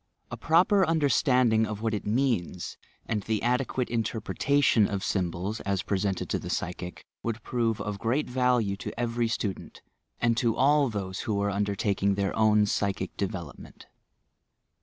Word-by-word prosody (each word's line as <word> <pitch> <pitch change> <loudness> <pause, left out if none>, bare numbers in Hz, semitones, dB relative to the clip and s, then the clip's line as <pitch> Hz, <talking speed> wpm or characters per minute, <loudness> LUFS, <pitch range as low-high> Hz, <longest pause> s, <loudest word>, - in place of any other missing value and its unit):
A - - -3
proper 180 +5 +4
under 160 -4 +2
standing 120 -4 +3
of 105 0 -5
what 110 -1 0
it 105 - -3
means, 110 -7 -1 0.3
and 110 -2 -1
the 110 +1 -2
adequate 125 +1 0
interpre 115 -1 -2
tation 140 -7 +3
of 100 -1 -2
symbols, 95 +3 -2
as 100 0 -1
presented 100 -2 -1
to - - 0
the - - -7
psychic, 90 0 -4 0.2
would 115 0 -4
prove 115 -3 0
of 105 -1 -4
great 120 +8 0
value 125 -5 +1
to 115 - -7
every 120 -1 0
student, 105 -3 -4 0.4
and 120 -1 +2
to 115 -2 +2
all 140 +1 +4
those 95 -4 -4
who 105 -2 -1
are 100 0 0
undertaking 100 0 0
their 100 -1 -1
own 105 -1 +4
psychic 100 -2 -1
development. 90 -6 -6
110 Hz, 160 wpm, -27 LUFS, 100-120 Hz, 0.4 s, proper